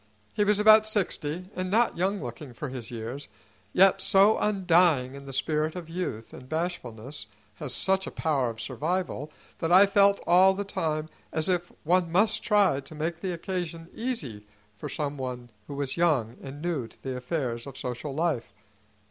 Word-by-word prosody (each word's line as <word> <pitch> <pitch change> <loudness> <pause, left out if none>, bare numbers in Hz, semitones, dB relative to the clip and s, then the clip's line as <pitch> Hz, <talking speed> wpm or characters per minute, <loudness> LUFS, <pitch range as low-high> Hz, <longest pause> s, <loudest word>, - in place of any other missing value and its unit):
He 210 - +2
was 205 0 +3
about 215 +1 +7
sixty, 185 -4 -2
and 185 0 -3
not 230 +5 +3
young 195 +4 0
looking 125 0 -7
for 150 - -5
his 125 -3 -6
years, 120 +4 -6 0.4
yet 190 - +5
so 200 +3 +6
undying 175 -10 +3
is 140 0 -10
the - - -6
spirit 155 +4 -1
of 170 -2 -7
youth, 165 -11 -4
and 130 0 -11
bashfulness 145 - -4 0.3
has 145 -4 -5
such 190 0 +1
a - - -5
power 140 -7 0
of 115 -1 -8
survival, 155 +3 -3 0.3
that 165 - -1
I 190 +3 +8
felt 200 0 +4
all 185 +2 +6
the 200 - -2
time 160 -6 -2 0.2
as 160 -1 0
if 175 -1 0
one 175 +1 +2
must 205 +5 +3
try 205 -10 +3
to 140 +3 -11
make 165 +2 -3
the 190 - -2
occasion 170 -1 -4
easy 145 - -4 0.3
for - - -7
some 145 -1 -3
one 125 -2 -5 0.2
who 140 - -6
was 140 0 -3
young 140 -10 +2
and 140 +3 -9
new 160 -9 -1
to - - -20
the 130 -1 -3
affairs 125 -2 -3
of 135 - -9
social 125 +3 -5
life. 155 -9 -1
160 Hz, 180 wpm, -27 LUFS, 135-185 Hz, 0.4 s, I